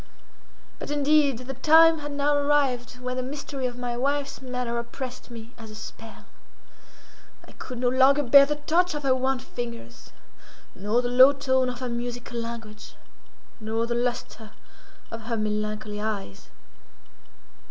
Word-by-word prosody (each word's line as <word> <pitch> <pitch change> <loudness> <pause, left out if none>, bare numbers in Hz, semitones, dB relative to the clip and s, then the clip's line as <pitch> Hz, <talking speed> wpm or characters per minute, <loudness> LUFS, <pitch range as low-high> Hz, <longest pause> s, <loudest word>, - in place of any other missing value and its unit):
But, - - -6
indeed, 290 -2 +3
the 270 - -5
time 320 +4 +6
had 290 0 -6
now 285 +1 +1
arrived 275 -4 +1
when 250 0 -4
the - - 0
mystery 270 0 -4
of 245 -1 -7
my 245 -1 -3
wife's 280 +2 -1
manner 250 -2 -3
oppressed 255 +2 -7
me 230 0 -10
as 225 -1 -10
a 215 - -10
spell. 225 +1 -10 1.2
I - - -14
could 250 - -8
no 245 +1 +1
longer 270 +3 +4
bear 280 +2 +7
the 295 - -1
touch 325 +4 +1
of 295 - -4
her 270 -1 +3
wan 260 +1 0
fingers, 235 - -8 0.6
nor 210 +6 0
the - - 0
low 255 +3 +7
tone 260 -2 +1
of 250 +1 -6
her 255 - -2
musical 240 0 -5
language, 230 -2 -8 0.6
nor 220 +1 -2
the 235 - -2
lustre 240 -2 -3 0.6
of 230 - -6
her 230 - -1
melancholy 210 0 -3
eyes. 205 - -5
250 Hz, 150 wpm, -25 LUFS, 235-280 Hz, 1.2 s, bear